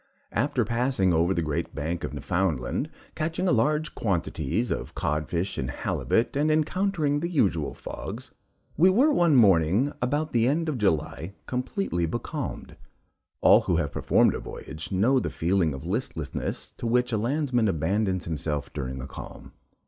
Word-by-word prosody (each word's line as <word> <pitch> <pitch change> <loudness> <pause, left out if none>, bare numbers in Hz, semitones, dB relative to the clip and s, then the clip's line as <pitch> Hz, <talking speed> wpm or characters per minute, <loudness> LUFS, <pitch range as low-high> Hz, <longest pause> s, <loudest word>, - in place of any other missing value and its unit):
After 120 +1 +1
passing 115 -5 +1
over 85 +3 +3
the 85 -3 0
great 75 -2 -3
bank 80 +4 -3
of - - -3
Newfoundland, 80 -10 -1 0.2
catching 165 +4 -2
large 150 0 +2
quantities 95 - -1
of - - -4
codfish 85 +5 -1
and 65 - -2
halibut, 115 - 0
and 150 +2 +2
encountering 155 -1 +1
the 170 +3 -2
usual 95 - +1
fogs, - - -7 0.4
we 180 +4 +6
were 265 +11 +4
one 170 - +4
morning, 100 - +4
about 145 +5 -1
the 115 0 +3
end 160 +5 +1
of 140 -5 -2
July, 85 -1 -1
completely 125 - -1
becalmed. - - -5 0.6
All - - +7
who 90 - 0
have 80 -3 0
performed - - +3
a - - -3
voyage, 80 +3 -8
know 115 +8 +3
the - - -2
feeling 85 -1 +1
of 70 -1 -7
listlessness - - -3
to 120 - -3
which 125 +1 +2
a 110 - +1
landsman 125 -1 +1
abandons 95 +2 0
himself 75 -2 -3
during 65 -2 -4
a - - -6
calm. - - -10
105 Hz, 155 wpm, -26 LUFS, -, 0.6 s, All